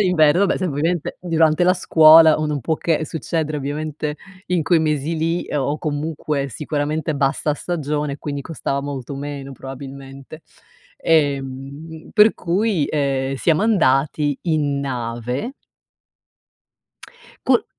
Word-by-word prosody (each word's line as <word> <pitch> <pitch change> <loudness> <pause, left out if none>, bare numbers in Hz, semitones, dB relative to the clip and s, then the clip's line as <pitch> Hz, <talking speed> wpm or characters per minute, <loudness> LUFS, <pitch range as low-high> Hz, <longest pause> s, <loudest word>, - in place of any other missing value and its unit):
d'inverno, 180 0 +4
vabbè - - 0
sai 185 -2 -1
ovviamente 155 +3 -1
durante 165 -1 +2
la 180 +1 +4
scuola 160 -3 +7
o 155 - -1
non 150 -2 -2
può 160 +7 0
che 160 -1 0
succedere 155 0 -3
ovviamente 150 +1 -4 0.3
in 175 -2 0
quei 170 +3 +3
mesi 155 0 -1
lì, 165 +2 0
ehm, 145 - -2
o 145 +3 -1
comunque 150 -2 -2
sicuramente 150 +3 -2
bassa 140 +2 0
stagione, 150 -3 -3
quindi 145 -1 -4
costava 140 -2 -3
molto 140 -1 -5
meno 140 -1 -6
probabilmente. 135 +2 -10 0.5
Ehm, 145 +1 -1
per 215 0 +6
cui, 185 -2 0
ehm, 135 -2 -1
siamo 160 +6 +2
andati 145 -7 +2
in 150 -4 0
nave. 125 - -3 1.9
Col - - +4
150 Hz, 125 wpm, -20 LUFS, 140-160 Hz, 1.9 s, scuola